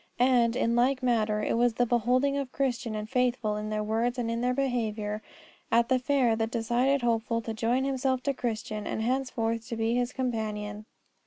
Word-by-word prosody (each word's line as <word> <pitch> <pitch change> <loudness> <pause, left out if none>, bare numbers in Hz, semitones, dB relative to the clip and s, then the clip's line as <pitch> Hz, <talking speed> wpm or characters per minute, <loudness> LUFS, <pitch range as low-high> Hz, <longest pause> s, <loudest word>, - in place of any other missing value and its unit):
And, 245 -2 +3
in 235 -2 +1
like 255 +2 +2
manner, 215 -3 +1
it - - 0
was 240 -1 +2
the 245 - +2
beholding 250 +4 +2
of 275 -2 -3
Christian 250 -4 -1
and 215 0 -4
Faithful 245 -3 0
in 210 0 -4
their 215 0 -1
words 230 +4 0
and 235 -2 -1
in 230 0 -2
their 250 0 +1
behaviour 220 -5 -1 0.5
at 235 +1 +3
the 260 -1 +3
fair 250 -3 +2
that 225 0 0
decided 240 +4 +1
Hopeful 230 0 +1
to 225 - -4
join 235 +4 +1
himself 265 -1 0
to 280 - 0
Christian 215 -4 -3
and 220 - -2
henceforth 230 -3 -1
to 230 - -4
be 225 +1 +1
his 245 0 0
companion. 215 -4 -3
235 Hz, 190 wpm, -28 LUFS, 220-255 Hz, 0.5 s, And